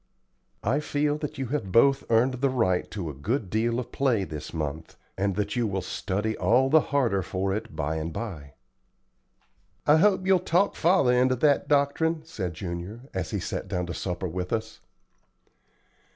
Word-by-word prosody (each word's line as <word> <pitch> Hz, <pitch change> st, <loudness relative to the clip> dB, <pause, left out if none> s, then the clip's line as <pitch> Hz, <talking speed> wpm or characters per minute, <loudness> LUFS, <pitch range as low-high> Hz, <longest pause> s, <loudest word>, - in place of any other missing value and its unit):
I 140 Hz, -, +1 dB
feel 150 Hz, 0 st, 0 dB
that 150 Hz, 0 st, -5 dB
you 135 Hz, -, -2 dB
have 115 Hz, -9 st, -2 dB
both 135 Hz, +6 st, +4 dB
earned 125 Hz, +3 st, +2 dB
the 140 Hz, -, +3 dB
right 110 Hz, -9 st, +1 dB
to 85 Hz, -7 st, -4 dB
a -, -, -10 dB
good 100 Hz, -, -2 dB
deal 115 Hz, +2 st, +1 dB
of 125 Hz, -1 st, -6 dB
play 125 Hz, -7 st, +1 dB
this 75 Hz, -4 st, -7 dB
month, 80 Hz, 0 st, -5 dB, 0.2 s
and 100 Hz, -1 st, 0 dB
that 105 Hz, 0 st, -2 dB
you 120 Hz, -2 st, +1 dB
will 95 Hz, -2 st, -2 dB
study 105 Hz, +4 st, -2 dB
all 130 Hz, +4 st, +3 dB
the 160 Hz, -, +7 dB
harder 120 Hz, -9 st, +2 dB
for 95 Hz, +1 st, -2 dB
it 105 Hz, -6 st, -5 dB
by 80 Hz, +1 st, -1 dB
and 80 Hz, +1 st, -3 dB
by." 80 Hz, -, -6 dB, 1.3 s
"I 150 Hz, +1 st, +6 dB
hope 190 Hz, +1 st, +3 dB
you'll 190 Hz, -1 st, +4 dB
talk 180 Hz, +3 st, +1 dB
father 170 Hz, -7 st, +3 dB
into 130 Hz, +1 st, +3 dB
that 145 Hz, +2 st, +2 dB
doctrine," 155 Hz, +3 st, +1 dB
said 95 Hz, -, -5 dB
Junior, 90 Hz, +6 st, -6 dB
as 95 Hz, -3 st, -3 dB
he -, -, -2 dB
sat -, -, -4 dB
down 90 Hz, -2 st, -2 dB
to 85 Hz, -, -5 dB
supper 90 Hz, +2 st, -3 dB
with 90 Hz, +1 st, -4 dB
us. 110 Hz, -1 st, -3 dB
110 Hz, 180 wpm, -26 LUFS, 90-140 Hz, 1.3 s, the